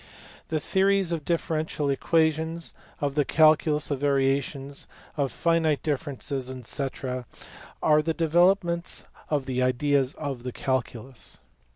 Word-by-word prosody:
The 155 Hz, -, -1 dB
theories 195 Hz, +2 st, +2 dB
of 165 Hz, -3 st, -2 dB
differential 155 Hz, -3 st, -1 dB
equations, 160 Hz, +3 st, 0 dB, 0.3 s
of 145 Hz, -1 st, 0 dB
the 145 Hz, 0 st, +2 dB
calculus 155 Hz, 0 st, +3 dB
of 140 Hz, -, -1 dB
variations, 140 Hz, 0 st, 0 dB, 0.3 s
of 140 Hz, -3 st, 0 dB
finite 165 Hz, -3 st, +1 dB
differences, 140 Hz, -3 st, -2 dB, 0.2 s
&c. 140 Hz, -, 0 dB, 1.0 s
are 150 Hz, -1 st, +5 dB
the 165 Hz, +1 st, -1 dB
develop 175 Hz, +4 st, +4 dB
ments 170 Hz, 0 st, -1 dB, 0.2 s
of 145 Hz, -3 st, 0 dB
the 130 Hz, -1 st, -1 dB
ideas 130 Hz, +1 st, +2 dB
of 140 Hz, -5 st, -4 dB
the 125 Hz, +1 st, -5 dB
calculus. 130 Hz, -1 st, -3 dB
150 Hz, 125 wpm, -26 LUFS, 135-160 Hz, 1.0 s, are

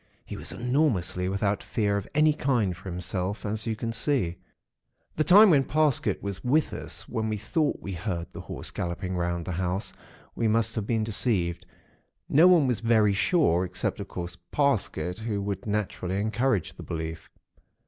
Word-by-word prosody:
He -, -, -7 dB
was -, -, -4 dB
enormously 120 Hz, -, 0 dB
without 100 Hz, +1 st, 0 dB
fear 105 Hz, -2 st, 0 dB
of 100 Hz, -1 st, -3 dB
any 155 Hz, 0 st, +5 dB
kind 120 Hz, -11 st, 0 dB
for 95 Hz, +2 st, -9 dB
himself, 90 Hz, +3 st, -3 dB
as 110 Hz, +2 st, -2 dB
you 110 Hz, -, 0 dB
can 115 Hz, +1 st, -3 dB
see. 115 Hz, -, 0 dB, 0.8 s
"The 155 Hz, -, +2 dB
time 200 Hz, +4 st, +8 dB
when 140 Hz, -4 st, +5 dB
Parsket 150 Hz, -1 st, +1 dB
was 100 Hz, -2 st, -4 dB
with 145 Hz, +5 st, +2 dB
us, -, -, -6 dB
when 110 Hz, -1 st, -2 dB
we 110 Hz, -, -1 dB
thought 145 Hz, +9 st, 0 dB
we 100 Hz, -, -4 dB
heard 90 Hz, -1 st, -3 dB
the -, -, -8 dB
Horse -, -, -4 dB
galloping 90 Hz, +2 st, -3 dB
round 85 Hz, -1 st, -1 dB
the -, -, -4 dB
house, 90 Hz, +2 st, -2 dB, 0.4 s
we 115 Hz, -, +1 dB
must 115 Hz, +1 st, +2 dB
have 110 Hz, -3 st, -3 dB
been 110 Hz, -2 st, +1 dB
deceived. 100 Hz, -5 st, 0 dB, 0.6 s
No 160 Hz, +5 st, +6 dB
one 175 Hz, -5 st, +6 dB
was 125 Hz, -5 st, 0 dB
very 110 Hz, -3 st, +3 dB
sure, 100 Hz, -, +2 dB
except, 90 Hz, -1 st, -3 dB
of -, -, -5 dB
course, 85 Hz, 0 st, -5 dB, 0.2 s
Parsket, 105 Hz, -, 0 dB
who 110 Hz, -2 st, -2 dB
would 100 Hz, 0 st, -4 dB
naturally 100 Hz, -2 st, -2 dB
encourage 110 Hz, -1 st, 0 dB
the -, -, -11 dB
belief. 80 Hz, 0 st, -5 dB
105 Hz, 175 wpm, -27 LUFS, 90-125 Hz, 0.8 s, time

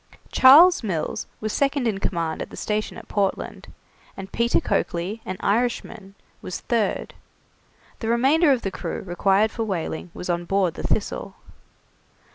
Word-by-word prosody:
Charles 315 Hz, +8 st, +8 dB
Mills 190 Hz, -2 st, -3 dB
was 215 Hz, -1 st, -2 dB
second 280 Hz, -3 st, +1 dB
in 205 Hz, -3 st, -1 dB
command 165 Hz, -4 st, -2 dB
at -, -, -5 dB
the -, -, -11 dB
station 215 Hz, 0 st, -2 dB
at -, -, -11 dB
Portland, 200 Hz, -2 st, -2 dB, 0.5 s
and 195 Hz, 0 st, -8 dB
Peter 235 Hz, +1 st, +2 dB
Coakley, 185 Hz, +6 st, -2 dB
an 185 Hz, -, -4 dB
Irishman, 210 Hz, -2 st, -1 dB, 0.3 s
was 185 Hz, -, -6 dB
third; 230 Hz, -4 st, -1 dB, 0.9 s
the 225 Hz, -, -4 dB
remainder 275 Hz, +7 st, +4 dB
of 255 Hz, -3 st, +1 dB
the 195 Hz, -, -2 dB
crew -, -, -5 dB
required 195 Hz, +4 st, +2 dB
for 230 Hz, -, -3 dB
whaling 180 Hz, -4 st, -4 dB
was -, -, -6 dB
on 175 Hz, -1 st, -1 dB
board 190 Hz, -2 st, +1 dB
the -, -, -7 dB
'Thistle'. -, -, -2 dB
210 Hz, 150 wpm, -23 LUFS, 185-235 Hz, 0.9 s, Charles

